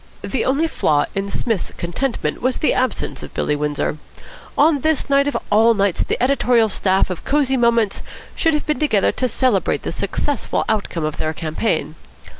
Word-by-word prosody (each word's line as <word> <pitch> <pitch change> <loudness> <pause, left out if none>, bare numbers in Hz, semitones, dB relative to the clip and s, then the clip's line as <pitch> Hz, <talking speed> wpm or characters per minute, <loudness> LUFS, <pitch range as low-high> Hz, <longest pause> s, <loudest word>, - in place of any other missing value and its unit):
The 215 +4 -1
only 285 +5 +2
flaw 150 - +1
in 195 0 -2
Psmith's 220 -1 -2
contentment 205 +10 -2
was 255 0 0
the 305 - +2
absence 255 0 -1
of - - -10
Billy 150 - 0
Windsor. 150 +1 -2 0.6
On 300 0 +4
this 310 -1 0
night 280 0 +4
of 285 - 0
all 225 +2 +5
nights 200 -3 +1
the - - -2
editorial 245 -3 +3
staff 190 -1 +1
of 180 - -6
Cosy 275 -2 +1
Moments 235 -4 +2 0.3
should 325 -1 +2
have 300 - -2
been 300 -4 -1
together 220 -10 +2
to 255 - -1
celebrate 240 -8 +1
the - - -3
successful 205 - -2
outcome 200 -6 -1
of 155 - -3
their 155 0 -2
campaign. 160 +2 -2
230 Hz, 175 wpm, -20 LUFS, 190-275 Hz, 0.6 s, all